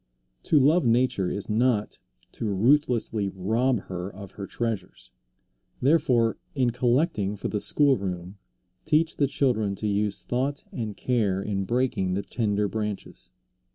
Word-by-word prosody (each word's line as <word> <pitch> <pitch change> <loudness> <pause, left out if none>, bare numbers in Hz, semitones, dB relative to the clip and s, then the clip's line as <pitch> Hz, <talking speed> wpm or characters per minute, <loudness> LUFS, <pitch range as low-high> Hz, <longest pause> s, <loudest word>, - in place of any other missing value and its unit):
To 155 - +3
love 150 +6 +4
nature 115 -6 +2
is 100 - -3
not 110 -1 +1 0.3
to - - -5
ruthlessly 115 -2 +2
rob 110 +6 0
her 90 -1 -6
of 100 0 -10
her 100 -1 -7
treasures. 105 - -4 0.7
Therefore 125 -6 +3 0.2
in 125 -3 +2
collecting 120 - +1
for 105 - -4
the 105 - -1
school 140 +5 +4
room 90 0 -5 0.4
teach 155 +1 +1
the 140 - +3
children 110 -8 0
to 105 - -5
use 105 0 0
thought 135 +3 -2
and 110 -4 -5
care 105 -7 0
in 100 -1 -2
breaking 120 -6 0
the 100 - -2
tender 105 0 0
branches. 105 -3 -5
110 Hz, 140 wpm, -26 LUFS, 100-130 Hz, 0.7 s, love